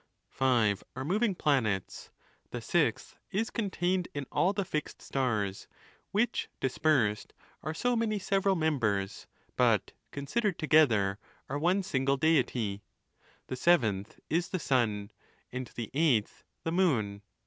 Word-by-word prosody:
Five 115 Hz, -7 st, +2 dB
are 130 Hz, +1 st, -4 dB
moving 205 Hz, +4 st, +1 dB
planets 115 Hz, -, 0 dB, 0.2 s
;' -, -, -37 dB
the -, -, -5 dB
sixth -, -, 0 dB
is 225 Hz, +4 st, -1 dB
contained 185 Hz, -4 st, 0 dB
in 145 Hz, -1 st, -3 dB
all 180 Hz, -, +3 dB
the 200 Hz, -1 st, -2 dB
fixed 155 Hz, -3 st, -4 dB
stars; 110 Hz, -8 st, -1 dB, 0.4 s
which, 235 Hz, +4 st, 0 dB
dispersed, 130 Hz, -6 st, +1 dB, 0.3 s
are 155 Hz, +1 st, -4 dB
so 245 Hz, +7 st, +1 dB
many 225 Hz, -2 st, 0 dB
several 195 Hz, 0 st, +1 dB
members, 115 Hz, -, 0 dB, 0.3 s
but, -, -, +3 dB, 0.2 s
Considered 185 Hz, +8 st, -1 dB
together, 115 Hz, -, +3 dB, 0.3 s
are 145 Hz, +2 st, -2 dB
one 180 Hz, +5 st, +2 dB
single 135 Hz, -6 st, +1 dB
Deity; 125 Hz, -9 st, +1 dB, 0.6 s
the 130 Hz, -, -4 dB
seventh 110 Hz, -, +2 dB
is 170 Hz, +2 st, 0 dB
the 185 Hz, -, -1 dB
sun; 115 Hz, -, 0 dB, 0.4 s
and 125 Hz, 0 st, -4 dB
the 115 Hz, -2 st, -5 dB
eighth 135 Hz, -8 st, +1 dB, 0.2 s
the 165 Hz, -, -1 dB
moon. 120 Hz, -, +1 dB
145 Hz, 130 wpm, -30 LUFS, 110-180 Hz, 0.6 s, all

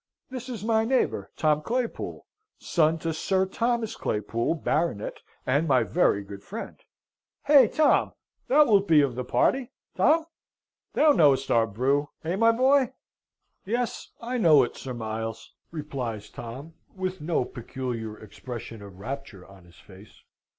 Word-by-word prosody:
This 255 Hz, -1 st, -6 dB
is 225 Hz, -5 st, -6 dB
my 220 Hz, 0 st, +2 dB
neighbour, 255 Hz, +3 st, 0 dB
Tom 155 Hz, -1 st, +2 dB
Claypool, 240 Hz, +6 st, -3 dB, 0.3 s
son 160 Hz, -1 st, +1 dB
to 165 Hz, 0 st, -3 dB
Sir 190 Hz, +4 st, +1 dB
Thomas 230 Hz, +2 st, -1 dB
Claypool, 115 Hz, +7 st, -1 dB
Baronet, 155 Hz, -8 st, -2 dB, 0.2 s
and 145 Hz, +6 st, +1 dB
my 130 Hz, -4 st, +4 dB
very 100 Hz, -, +2 dB
good 100 Hz, 0 st, -10 dB
friend. 210 Hz, -, -7 dB, 0.7 s
Hey, 280 Hz, -5 st, +7 dB
Tom! 310 Hz, +7 st, +2 dB, 0.3 s
Thou 300 Hz, +3 st, +6 dB
wilt 200 Hz, -4 st, +3 dB
be 155 Hz, -2 st, +6 dB
of 140 Hz, -3 st, 0 dB
the 125 Hz, +1 st, -4 dB
party, 255 Hz, -, +1 dB, 0.3 s
Tom? 320 Hz, +1 st, +3 dB, 0.7 s
Thou 305 Hz, 0 st, +5 dB
knowest 140 Hz, -, +3 dB
our 115 Hz, -1 st, +4 dB
brew, 135 Hz, +7 st, 0 dB
hey, 165 Hz, +3 st, -1 dB
my 230 Hz, +3 st, +5 dB
boy?" 260 Hz, +2 st, +3 dB, 0.7 s
"Yes, 235 Hz, +4 st, -3 dB
I 245 Hz, +2 st, -3 dB
know 155 Hz, -, +6 dB
it, 120 Hz, -, -4 dB
Sir 130 Hz, -2 st, -6 dB
Miles," 115 Hz, 0 st, -5 dB, 0.2 s
replies 125 Hz, -9 st, -5 dB
Tom, 130 Hz, +8 st, -8 dB, 0.2 s
with 185 Hz, -1 st, -4 dB
no 155 Hz, -4 st, 0 dB
peculiar 120 Hz, -3 st, -5 dB
expression 115 Hz, +1 st, -9 dB
of 100 Hz, -2 st, -12 dB
rapture 115 Hz, -3 st, -7 dB
on 95 Hz, -2 st, -17 dB
his 85 Hz, -, -19 dB
face. 100 Hz, +2 st, -17 dB
150 Hz, 145 wpm, -26 LUFS, -, 0.7 s, Hey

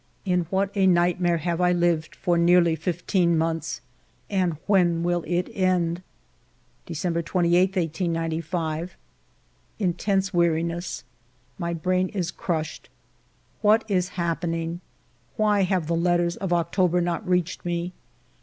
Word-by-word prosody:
In 180 Hz, -3 st, +1 dB
what 195 Hz, +1 st, 0 dB
a 195 Hz, -2 st, +3 dB
nightmare 175 Hz, -1 st, +3 dB
have 170 Hz, +2 st, -2 dB
I 180 Hz, 0 st, +4 dB
lived 175 Hz, -2 st, +1 dB
for 175 Hz, -2 st, 0 dB
nearly 170 Hz, -1 st, +4 dB
fifteen 170 Hz, +1 st, 0 dB
months, 160 Hz, 0 st, -2 dB, 0.5 s
and 180 Hz, -5 st, +1 dB
when 175 Hz, -4 st, +3 dB
will 175 Hz, -1 st, 0 dB
it 175 Hz, +2 st, 0 dB
end? 180 Hz, -2 st, +1 dB, 0.9 s
December 170 Hz, +1 st, -1 dB
28, 180 Hz, +2 st, +2 dB
1895. 165 Hz, -1 st, -2 dB, 0.8 s
Intense 195 Hz, 0 st, 0 dB
weariness! 170 Hz, -1 st, 0 dB, 0.6 s
My 170 Hz, -1 st, -2 dB
brain 185 Hz, +3 st, 0 dB
is 185 Hz, -5 st, -2 dB
crushed. 160 Hz, -3 st, -4 dB, 0.7 s
What 215 Hz, +1 st, +4 dB
is 185 Hz, -3 st, +1 dB
happening? 165 Hz, 0 st, -2 dB, 0.5 s
Why 210 Hz, -2 st, +2 dB
have 185 Hz, -3 st, +1 dB
the 165 Hz, +2 st, 0 dB
letters 175 Hz, 0 st, +1 dB
of 190 Hz, -2 st, -4 dB
October 175 Hz, +1 st, +2 dB
not 175 Hz, 0 st, -2 dB
reached 180 Hz, -1 st, 0 dB
me? 175 Hz, +1 st, -2 dB
175 Hz, 120 wpm, -25 LUFS, 170-185 Hz, 0.9 s, I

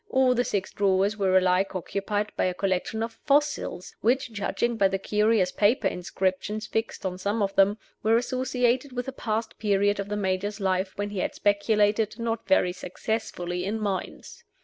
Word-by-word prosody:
All 260 Hz, -1 st, +4 dB
the 245 Hz, 0 st, +1 dB
six 200 Hz, -5 st, -2 dB
drawers 195 Hz, +1 st, +2 dB
were 190 Hz, -3 st, +3 dB
alike 185 Hz, +1 st, +2 dB
occupied 205 Hz, +3 st, -2 dB
by -, -, +1 dB
a 180 Hz, -1 st, -1 dB
collection 195 Hz, +4 st, -1 dB
of 225 Hz, 0 st, -6 dB
fossils, 290 Hz, -10 st, +1 dB
which 250 Hz, +2 st, +1 dB
(judging 230 Hz, +3 st, -1 dB
by 200 Hz, -3 st, +4 dB
the 195 Hz, 0 st, -1 dB
curious 210 Hz, -1 st, +2 dB
paper 210 Hz, +7 st, +2 dB
inscriptions 190 Hz, +4 st, -2 dB
fixed 225 Hz, -2 st, -3 dB
on 185 Hz, -1 st, -3 dB
some 205 Hz, +3 st, 0 dB
of 195 Hz, 0 st, -1 dB
them) 200 Hz, +2 st, +4 dB, 0.2 s
were 225 Hz, +1 st, +4 dB
associated 255 Hz, +1 st, 0 dB
with 245 Hz, 0 st, -3 dB
a -, -, -2 dB
past 225 Hz, -3 st, -3 dB
period 205 Hz, -1 st, +2 dB
of 200 Hz, 0 st, -4 dB
the 210 Hz, -, -2 dB
Major's 195 Hz, +1 st, -1 dB
life 190 Hz, -1 st, 0 dB
when 205 Hz, 0 st, -3 dB
he 200 Hz, -, -3 dB
had -, -, -2 dB
speculated, 210 Hz, +1 st, +2 dB
not 230 Hz, -1 st, -3 dB
very 180 Hz, -11 st, +3 dB
successfully 180 Hz, -2 st, -3 dB
in 210 Hz, +4 st, -2 dB
mines. 205 Hz, -, -4 dB
205 Hz, 175 wpm, -26 LUFS, 190-225 Hz, 0.2 s, All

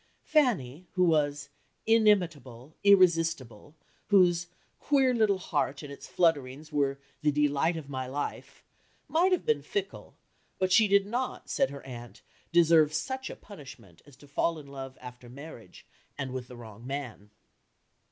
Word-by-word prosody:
Fanny, 185 Hz, -, +1 dB
who 185 Hz, -, +2 dB
was 145 Hz, -4 st, +1 dB, 0.4 s
"inimitable, 165 Hz, -, +1 dB
irresistible," 165 Hz, -, +3 dB, 0.3 s
whose 175 Hz, -4 st, +4 dB, 0.3 s
"queer 270 Hz, -3 st, +2 dB
little 215 Hz, -4 st, +2 dB
heart" 150 Hz, -5 st, -2 dB
and 140 Hz, -1 st, -8 dB
its -, -, -11 dB
flutterings 150 Hz, -3 st, 0 dB
were 140 Hz, -2 st, 0 dB, 0.2 s
"the 150 Hz, -1 st, +2 dB
delight 150 Hz, +3 st, +1 dB
of 155 Hz, -3 st, -8 dB
my 130 Hz, -2 st, -4 dB
life," 145 Hz, +3 st, -6 dB, 0.4 s
might 350 Hz, +4 st, +2 dB
have 365 Hz, -, +1 dB
been 455 Hz, -1 st, +1 dB
fickle, 400 Hz, -2 st, -5 dB, 0.4 s
but 185 Hz, 0 st, 0 dB
she 220 Hz, +3 st, +6 dB
did 200 Hz, 0 st, +4 dB
not, 245 Hz, +5 st, -4 dB
said 275 Hz, -, +2 dB
her 140 Hz, -, -10 dB
aunt, 120 Hz, -2 st, -10 dB, 0.3 s
deserve 165 Hz, -3 st, +5 dB
such 265 Hz, 0 st, -3 dB
a -, -, -7 dB
punishment 135 Hz, -, -13 dB
as 145 Hz, -, -16 dB
to 145 Hz, +2 st, -18 dB
fall 165 Hz, +4 st, 0 dB
in 150 Hz, -, -10 dB
love 135 Hz, -1 st, -9 dB
after 125 Hz, -1 st, -11 dB
marriage, 130 Hz, -, -12 dB, 0.3 s
and 135 Hz, -2 st, -4 dB
with 130 Hz, -1 st, -5 dB
the 125 Hz, -, -11 dB
wrong 115 Hz, 0 st, -11 dB
man. 125 Hz, -7 st, -6 dB
150 Hz, 150 wpm, -29 LUFS, 135-190 Hz, 0.4 s, she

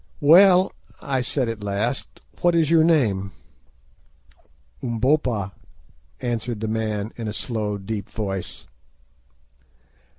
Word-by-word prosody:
"Well," 180 Hz, +5 st, +6 dB, 0.3 s
I 135 Hz, -2 st, -1 dB
said 125 Hz, +1 st, 0 dB
at 115 Hz, -2 st, -5 dB
last, 100 Hz, +6 st, -3 dB, 0.2 s
"What 175 Hz, -1 st, +3 dB
is 165 Hz, -2 st, +2 dB
your 165 Hz, -1 st, +6 dB
name?" 105 Hz, -, +2 dB, 1.5 s
"Umbopa," 120 Hz, -4 st, 0 dB, 0.7 s
answered 120 Hz, -2 st, -3 dB
the 110 Hz, -, -3 dB
man 110 Hz, -1 st, -2 dB
in 115 Hz, -2 st, -4 dB
a 105 Hz, -, -3 dB
slow, 110 Hz, -4 st, -3 dB
deep 100 Hz, +1 st, -5 dB
voice. 95 Hz, -4 st, -5 dB
115 Hz, 105 wpm, -23 LUFS, 105-140 Hz, 1.5 s, Well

